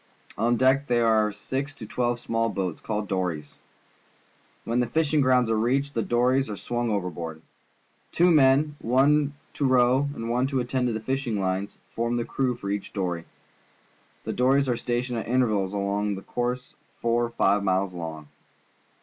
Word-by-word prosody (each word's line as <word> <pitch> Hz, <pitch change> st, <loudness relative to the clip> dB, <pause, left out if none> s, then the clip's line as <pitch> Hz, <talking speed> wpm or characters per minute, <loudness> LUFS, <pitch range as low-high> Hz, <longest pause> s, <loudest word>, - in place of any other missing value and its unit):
On 120 Hz, +3 st, +1 dB
deck 130 Hz, +3 st, +3 dB
there 120 Hz, -1 st, +2 dB
are 110 Hz, -2 st, +3 dB
six 140 Hz, +7 st, -4 dB
to 110 Hz, -, -8 dB
twelve 120 Hz, +2 st, -1 dB
small 115 Hz, -1 st, 0 dB
boats, 95 Hz, -6 st, -3 dB
called 105 Hz, -2 st, -3 dB
dories. 85 Hz, -6 st, -2 dB, 1.1 s
T^Tien 115 Hz, +2 st, 0 dB
the 125 Hz, -, +1 dB
fishing 155 Hz, 0 st, +1 dB
grounds 130 Hz, -2 st, +3 dB
are 115 Hz, -, +1 dB
reached, 135 Hz, +6 st, 0 dB
the 115 Hz, -, 0 dB
dories 125 Hz, +3 st, +2 dB
are 105 Hz, -, -5 dB
swung 120 Hz, +2 st, -2 dB
overboard. 85 Hz, -5 st, -4 dB, 0.7 s
Two 175 Hz, +1 st, +4 dB
men. 145 Hz, 0 st, +4 dB
one 140 Hz, +4 st, +2 dB, 0.2 s
to -, -, -3 dB
row 130 Hz, +1 st, +3 dB
and 115 Hz, -, -5 dB
one 125 Hz, +3 st, +1 dB
to 135 Hz, -1 st, -1 dB
attend 125 Hz, +1 st, 0 dB
to 120 Hz, -, -1 dB
the 110 Hz, -, -2 dB
fishing 125 Hz, -2 st, -2 dB
lines, 95 Hz, +1 st, -2 dB
form 120 Hz, +1 st, -1 dB
the 120 Hz, -, -1 dB
crew 130 Hz, -2 st, -1 dB
for 100 Hz, -2 st, -5 dB
each 100 Hz, -1 st, -4 dB
dory. 90 Hz, -4 st, -2 dB, 1.0 s
The -, -, -3 dB
dories 135 Hz, +2 st, +3 dB
are 125 Hz, -, +1 dB
stationed 120 Hz, 0 st, -2 dB
at -, -, -6 dB
intervals 110 Hz, -6 st, +1 dB
along 100 Hz, 0 st, -1 dB
a 95 Hz, -, -9 dB
course 125 Hz, +1 st, -3 dB, 0.3 s
four 120 Hz, 0 st, +1 dB
or -, -, -5 dB
five 100 Hz, -3 st, +2 dB
miles 95 Hz, -1 st, +1 dB
long. 80 Hz, -3 st, -6 dB
120 Hz, 175 wpm, -26 LUFS, 100-130 Hz, 1.1 s, Two